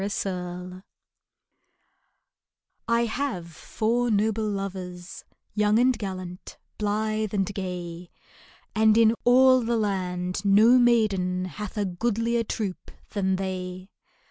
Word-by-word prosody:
MY 200 - -1 0.2
LOVERS 180 0 -5 2.1
I 235 0 +2
HAVE 220 -8 -3
four 235 +7 -1
noble 215 0 +1
lovers, 185 -3 -6 0.3
Young 210 0 +2
and 250 +2 +4
gallant, 185 -4 -7 0.2
blithe 215 0 -1
and 195 -1 +2
gay, 180 -2 -6 0.6
And 220 0 +4
in 225 -1 +5
all 255 +1 +6
the 235 0 0
land 185 -3 -2
no 215 +5 +6
maiden 200 -7 +2
Hath 210 +3 -7
a 205 - +1
goodlier 230 +5 0
troupe 205 -4 -4 0.2
than 190 -2 0
they 185 0 -5
205 Hz, 110 wpm, -26 LUFS, 185-225 Hz, 2.1 s, all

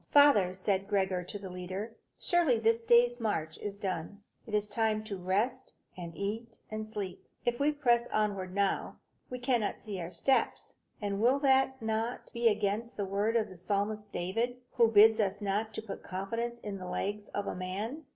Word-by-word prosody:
"Father," 285 -11 +6
said 190 +1 -1
Gregor 190 -3 +1
to 195 - -6
the 195 -2 -8
leader, 185 +5 -5 0.2
"surely 340 -9 +3
this 225 +1 +2
day's 240 +1 +4
march 160 -8 -2
is 200 -1 -5
done. 195 0 -4 0.2
It 215 - -2
is 210 0 +1
time 220 -1 0
to 215 -2 -5
rest, 205 +8 -1 0.2
and 170 -3 -8
eat, 225 +3 -4
and 215 0 -4
sleep. 200 -4 -5 0.2
If 240 0 0
we 290 +2 +3
press 240 -5 +2
onward 200 -4 -1
now, 200 -1 0 0.3
we 250 - -4
cannot 245 -4 0
see 200 -4 -5
our 170 - -4
steps; 225 +10 0 0.3
and 200 0 -1
will 255 +4 +4
not 265 -1 +3
that 225 +2 -2
be 235 -1 +2
against 215 +2 0
the 200 - -1
word 200 +4 0
of 225 -2 +2
the 185 - -11
psalmist 205 +3 -2
David, 230 +8 -1
who 235 -3 +5
bids 220 +1 +7
us 200 -1 +1
not 210 +2 -1
to 220 - -4
put 210 - -7
confidence 230 +6 -3
in 200 -2 -4
the 185 - -6
legs 205 +3 -3
of 205 - -3
a - - -2
man?" 205 +11 -4
210 Hz, 185 wpm, -31 LUFS, 195-235 Hz, 0.3 s, bids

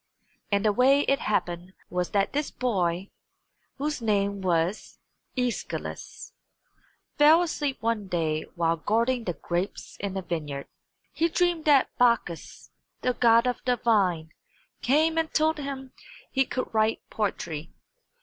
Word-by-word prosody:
And 200 +1 +2
the 210 - +4
way 270 +5 +5
it 275 -1 +1
happened 175 -3 -2 0.2
was 180 0 -1
that 200 -1 +1
this 295 +1 -1
boy, 190 -6 -1 0.6
whose 295 -1 -2
name 200 -2 0
was 175 +2 -1 0.4
Æschylus, 250 - -4 0.9
fell 315 +4 +7
asleep 290 -5 -2
one 225 -3 0
day 160 -4 -1
while 165 -1 +1
guarding 230 +7 0
the 175 - -1
grapes 175 +4 -4
in 195 -1 -3
a 190 - -3
vineyard. 150 -5 -4 0.5
He 330 +1 +1
dreamed 345 -2 +1
that 285 -4 +4
Bacchus, 235 -9 0 0.3
the 250 - +2
god 230 0 +5
of 250 -1 -1
the 250 -1 +2
vine, 185 -9 +1 0.5
came 315 +5 +3
and 320 -1 -1
told 315 0 +2
him 270 -2 -6
that - - -21 0.3
he 270 -1 +2
could 255 -2 -4
write 220 0 +1
poetry. 165 -7 -3
225 Hz, 140 wpm, -27 LUFS, 180-270 Hz, 0.9 s, fell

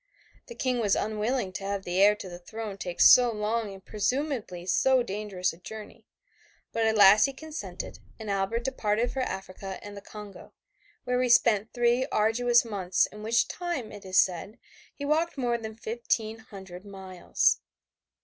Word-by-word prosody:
The 475 - -9
King 255 - 0
was 205 -4 +2
unwilling 215 -1 -1
to 195 - -6
have 200 0 -3
the 180 +1 0
heir 205 +1 +6
to 205 - -9
the 175 -1 -9
throne 215 +2 -6
take 180 -2 -5
so 245 -1 +8
long 215 0 -2
and 195 -1 -12
presumably 225 - -2
so 255 +7 +3
dangerous 195 -3 -2
a - - -14
journey, 215 +4 -10 0.7
but 225 -1 +1
at 220 - +2
last 205 +2 +8
he 275 - -3
consented 315 +3 -7 0.2
and 220 - -8
Albert 200 +4 -1
departed 235 -2 0
for 270 - -4
Africa 190 -3 -5
and 205 0 -9
the 200 - -8
Congo, 205 -1 -11 0.5
where 250 0 0
he 250 - +1
spent 225 -3 +4
three 240 +1 +2
arduous 235 +3 +3
months 190 -5 +1
in 210 - -11
which 225 +2 +2
time, 345 -11 -4
it 205 - -10
is 185 -1 -2
said, 190 +5 0 0.4
he 285 - -5
walked 315 +2 +1
more 240 -2 0
than 220 -1 -7
fifteen 225 0 -2
hundred 190 -4 -11
miles. 190 -3 0
215 Hz, 170 wpm, -28 LUFS, 195-240 Hz, 0.7 s, so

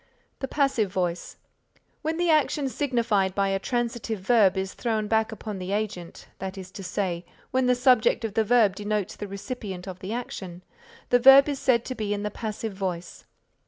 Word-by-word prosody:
The 270 - -3
passive 265 -9 +1
voice: 180 -2 -2 0.6
When 320 +1 -2
the 345 -1 +2
action 300 -2 +2
signified 230 -9 0
by 195 -1 +1
a 195 0 0
transitive 235 -2 -2
verb 200 -3 +4
is 190 0 -2
thrown 220 -3 -1
back 220 +1 +1
upon 210 -2 -6
the 185 +2 -4
agent, 205 -5 -4
that 190 0 -5
is 185 -1 -8
to 195 - -8
say, 180 -2 -2 0.3
when 260 -1 +2
the 250 - +4
subject 245 -2 +3
of 215 - -4
the 220 - +2
verb 215 -4 +4
denotes 210 -1 -2
the 205 - -6
recipient 200 -2 -6
of 185 -1 -7
the 190 +3 -6
action, 190 -7 -6 0.5
the 245 - +5
verb 270 +3 +8
is 285 -2 -2
said 240 -4 +2
to 255 - -3
be 210 -4 -2
in 205 - -4
the 210 - -2
passive 220 0 -5
voice. 180 -3 -5
215 Hz, 190 wpm, -26 LUFS, 190-245 Hz, 0.6 s, verb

